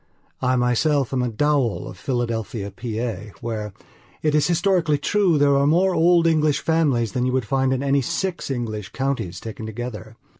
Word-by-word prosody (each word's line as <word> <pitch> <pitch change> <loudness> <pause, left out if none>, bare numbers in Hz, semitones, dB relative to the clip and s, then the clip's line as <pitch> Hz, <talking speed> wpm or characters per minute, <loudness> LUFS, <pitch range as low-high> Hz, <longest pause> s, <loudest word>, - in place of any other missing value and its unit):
I 130 0 +2
myself 130 +3 +1
am 130 - +1
a 125 - 0
Dowell 135 -1 0
of - - -8
Philadelphia, 115 -3 -3
Pa., 110 -4 -5
where, 110 -3 -4 0.5
it 155 -1 +2
is 150 -1 +3
historically 175 -3 +2
true, 185 +1 +2
there 140 -1 +4
are 140 +1 +3
more 180 +5 +3
old 170 0 +4
English 155 -3 +2
families 140 -9 +1
than 125 +3 0
you - - 0
would 130 -3 0
find 135 +3 +1
in 130 +1 0
any 140 0 +2
six 180 +7 -3
English 110 -6 -4
counties 135 -10 -2
taken 110 0 -7
together. 110 -1 -7
130 Hz, 175 wpm, -22 LUFS, 115-150 Hz, 0.5 s, there